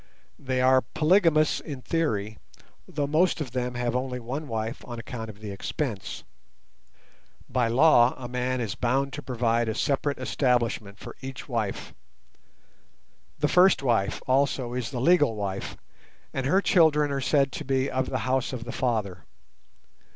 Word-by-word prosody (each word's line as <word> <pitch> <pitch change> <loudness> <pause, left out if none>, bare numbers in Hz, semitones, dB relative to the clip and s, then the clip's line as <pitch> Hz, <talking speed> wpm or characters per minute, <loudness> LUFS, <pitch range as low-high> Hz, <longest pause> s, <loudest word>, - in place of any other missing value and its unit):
They 130 -1 -1
are 130 0 +5
polygamous 160 -1 +3
in 140 -4 -8
theory, 110 -11 -1 0.5
though 145 -1 -2
most 160 +5 +2
of 140 -6 -4
them 125 0 -2
have 120 0 -1
only 125 0 -2
one 135 +6 -5
wife 110 -1 -4
on 120 -1 -7
account 115 -1 -6
of 105 0 -12
the 105 -2 -6
expense. 105 +2 -4 1.2
By 125 -2 +1
law 120 0 +5
a 125 - -6
man 125 +1 -2
is 110 -4 -2
bound 135 +3 0
to 150 - -5
provide 120 -3 0
a 110 - -2
separate 140 0 0
establishment 115 -3 0
for - - -10
each 130 -2 -7
wife. 115 -6 -3 1.4
The 150 - +1
first 180 -2 +5
wife 115 -6 0
also 130 -2 +1
is 125 -3 -3
the 130 - -4
legal 145 -4 +4
wife, 100 -2 -4 0.6
and 135 -1 -2
her 190 +8 +3
children 150 -4 +4
are 135 -1 -1
said 135 0 +2
to - - -5
be 135 0 0
"of 130 -1 -1
the - - -1
house 130 0 0
of 120 -2 -4
the 120 - -6
Father". 105 -9 -2
130 Hz, 160 wpm, -26 LUFS, 115-140 Hz, 1.4 s, are